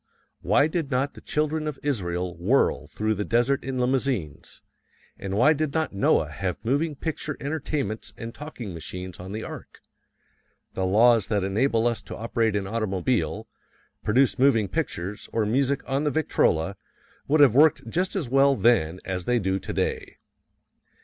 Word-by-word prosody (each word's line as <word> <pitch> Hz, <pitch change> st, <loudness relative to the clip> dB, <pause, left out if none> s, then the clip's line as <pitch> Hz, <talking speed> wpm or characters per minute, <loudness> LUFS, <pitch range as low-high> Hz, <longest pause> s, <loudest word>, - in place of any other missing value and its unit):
Why 145 Hz, -, +3 dB
did 155 Hz, -2 st, -2 dB
not 135 Hz, +1 st, 0 dB
the -, -, -13 dB
Children 155 Hz, +1 st, -1 dB
of 150 Hz, -3 st, -4 dB
Israel 90 Hz, -10 st, -2 dB
whirl 100 Hz, +11 st, +1 dB
through 110 Hz, +1 st, -1 dB
the 105 Hz, 0 st, -2 dB
desert 120 Hz, +5 st, +1 dB
in 130 Hz, -1 st, -4 dB
limousines, 125 Hz, -, -2 dB, 0.5 s
and 100 Hz, 0 st, -4 dB
why 150 Hz, +8 st, +5 dB
did 155 Hz, -1 st, -2 dB
not 160 Hz, -7 st, 0 dB
Noah 95 Hz, -5 st, +2 dB
have 90 Hz, +6 st, -4 dB
moving 145 Hz, +5 st, 0 dB
picture 155 Hz, 0 st, -4 dB
entertainments 140 Hz, -7 st, -3 dB
and 115 Hz, 0 st, -7 dB
talking 130 Hz, -, -8 dB
machines 90 Hz, +2 st, -7 dB
on 95 Hz, +2 st, -8 dB
the 110 Hz, +2 st, -4 dB
Ark? -, -, -9 dB, 0.9 s
The 95 Hz, -1 st, -1 dB
laws 110 Hz, +1 st, +4 dB
that 105 Hz, -3 st, 0 dB
enable 115 Hz, +4 st, +1 dB
us 115 Hz, -3 st, 0 dB
to 100 Hz, -, -8 dB
operate 115 Hz, -1 st, 0 dB
an 100 Hz, -1 st, -1 dB
automobile, 105 Hz, -2 st, -1 dB, 0.6 s
produce 130 Hz, +4 st, +2 dB
moving 125 Hz, -6 st, +4 dB
pictures, 95 Hz, +2 st, -4 dB
or 110 Hz, -2 st, 0 dB
music 135 Hz, +5 st, 0 dB
on 135 Hz, +2 st, 0 dB
the 150 Hz, -, +2 dB
Victrola, 100 Hz, -, +1 dB, 0.5 s
would 150 Hz, +1 st, +4 dB
have 135 Hz, -6 st, +7 dB
worked 150 Hz, +3 st, +4 dB
just 185 Hz, +3 st, -1 dB
as 175 Hz, -9 st, -1 dB
well 135 Hz, +2 st, +4 dB
then 95 Hz, -9 st, +2 dB
as 90 Hz, -2 st, -3 dB
they 125 Hz, -, +2 dB
do 95 Hz, -3 st, 0 dB
today. -, -, -3 dB
115 Hz, 160 wpm, -25 LUFS, 100-140 Hz, 0.9 s, have